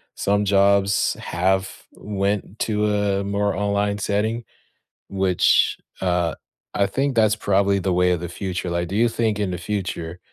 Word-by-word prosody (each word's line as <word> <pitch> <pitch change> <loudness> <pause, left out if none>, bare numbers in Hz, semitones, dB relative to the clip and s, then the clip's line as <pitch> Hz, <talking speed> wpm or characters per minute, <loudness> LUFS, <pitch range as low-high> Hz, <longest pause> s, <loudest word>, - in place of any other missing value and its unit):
some 100 +1 +1
jobs 100 0 +3
have 95 +2 -1
went 100 0 -3
to 105 -1 0
a 100 -1 0
more 100 +1 -1
online 100 +1 0
setting, 110 +4 -1 0.7
which, 95 -2 +2 0.2
uh, 90 -2 0 0.4
I 100 - +2
think 135 +6 -1
that's 110 -1 +4
probably 100 -1 +1
the 95 0 -1
way 90 0 +3
of 90 -2 -1
the 85 - -5
future, 90 0 -4
like, 85 0 -1
do 95 - -5
you 115 +2 +3
think 110 -2 -1
in 100 -3 -1
the 90 - -3
future 90 -2 -4
100 Hz, 155 wpm, -22 LUFS, 95-105 Hz, 0.7 s, that's